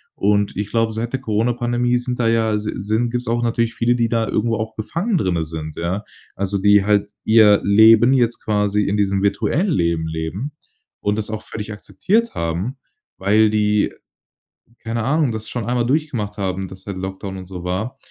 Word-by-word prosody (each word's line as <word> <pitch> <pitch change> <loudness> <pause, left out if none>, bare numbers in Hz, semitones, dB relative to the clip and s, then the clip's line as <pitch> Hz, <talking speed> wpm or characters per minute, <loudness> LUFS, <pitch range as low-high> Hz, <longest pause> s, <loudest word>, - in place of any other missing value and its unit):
und 100 0 +1
ich 105 +1 -2
glaube, 115 -1 0
seit 115 +2 -3
der 135 - 0
Coronapandemie 120 +1 0
sind 125 0 -4
da 115 - +2
ja 110 -2 +2
si 105 0 -3
sind 110 +4 -1
gibt's 125 +1 -3
auch 120 +1 0
natürlich 115 0 0
viele, 120 +1 +1
die 115 -1 +1
da 115 -1 0
irgendwo 115 +1 0
auch 110 +1 -4
befangen 175 - -1
drinnen 90 - 0
sind, 80 -1 -6
ja? 90 +5 -2 0.3
Also, 100 +1 -1
die 100 0 +4
halt 105 -1 +2
ihr 110 -2 +6
Leben 110 +4 +6
jetzt 120 -3 +1
quasi 105 -1 +1
in 100 - 0
diesem 100 -1 +1
virtuellen 100 - +1
Leben 85 - 0
leben 80 - -4 0.5
und 105 +1 -1
das 110 0 -3
auch 110 -1 -4
völlig 110 -1 -7
akzeptiert 190 - -1
haben, 85 +11 -2 0.4
weil 105 +3 +3
die- 105 -1 +1 0.9
keine 115 0 -2
Ahnung- 140 +1 +1
das 110 0 -6
schon 120 -3 -4
einmal 120 0 0
durchgemacht 125 -8 -1
haben, 95 -1 -2
dass 95 +1 -13
halt 100 -2 -5
Lockdown 95 +1 -5
und 95 - -9
so 90 -1 -8
war. 100 +9 -3
110 Hz, 185 wpm, -20 LUFS, 100-120 Hz, 0.9 s, ihr